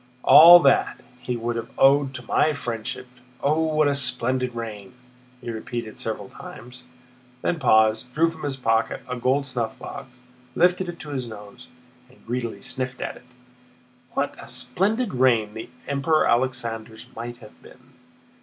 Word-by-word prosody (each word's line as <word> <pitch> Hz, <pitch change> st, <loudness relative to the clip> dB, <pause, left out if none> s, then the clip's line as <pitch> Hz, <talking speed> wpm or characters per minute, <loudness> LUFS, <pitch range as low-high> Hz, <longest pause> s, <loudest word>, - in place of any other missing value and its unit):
"All 170 Hz, +2 st, +10 dB
that, 140 Hz, -3 st, +2 dB, 0.2 s
he 125 Hz, -1 st, -3 dB
would 120 Hz, 0 st, -3 dB
have 115 Hz, 0 st, -5 dB
owed 135 Hz, 0 st, +4 dB
to 120 Hz, 0 st, -6 dB
my 155 Hz, -, +2 dB
friendship. 130 Hz, 0 st, -5 dB, 0.4 s
Oh, 150 Hz, +3 st, +2 dB
what 155 Hz, -1 st, +2 dB
a 145 Hz, -, +2 dB
splendid 130 Hz, -2 st, 0 dB
reign!" 110 Hz, -2 st, -7 dB, 0.5 s
he 120 Hz, -, -5 dB
repeated 115 Hz, 0 st, -6 dB
several -, -, -4 dB
times, 125 Hz, +1 st, -11 dB, 0.6 s
then 170 Hz, -, 0 dB
paused, 110 Hz, -1 st, +3 dB
drew 165 Hz, +2 st, +4 dB
from 160 Hz, -1 st, -13 dB
his 140 Hz, -2 st, -3 dB
pocket 115 Hz, -3 st, 0 dB
a 125 Hz, -, -4 dB
gold 130 Hz, +3 st, 0 dB
snuffbox, 120 Hz, -1 st, -5 dB, 0.5 s
lifted 180 Hz, +1 st, +2 dB
it 175 Hz, -, -7 dB
to 150 Hz, -, -9 dB
his 130 Hz, -4 st, -4 dB
nose, 105 Hz, -2 st, -11 dB, 0.4 s
and 130 Hz, -, -23 dB
greedily 120 Hz, -1 st, -4 dB
sniffed 130 Hz, -1 st, -4 dB
at -, -, -5 dB
it. -, -, -18 dB, 0.9 s
"What -, -, -1 dB
a -, -, -11 dB
splendid 215 Hz, +4 st, -1 dB
reign 120 Hz, -5 st, +2 dB
the 110 Hz, 0 st, -8 dB, 0.2 s
Emperor 140 Hz, +3 st, +1 dB
Alexander's 115 Hz, -3 st, -2 dB
might 120 Hz, +1 st, -6 dB
have 110 Hz, -3 st, -16 dB
been!" -, -, -18 dB
125 Hz, 155 wpm, -24 LUFS, 115-140 Hz, 0.9 s, All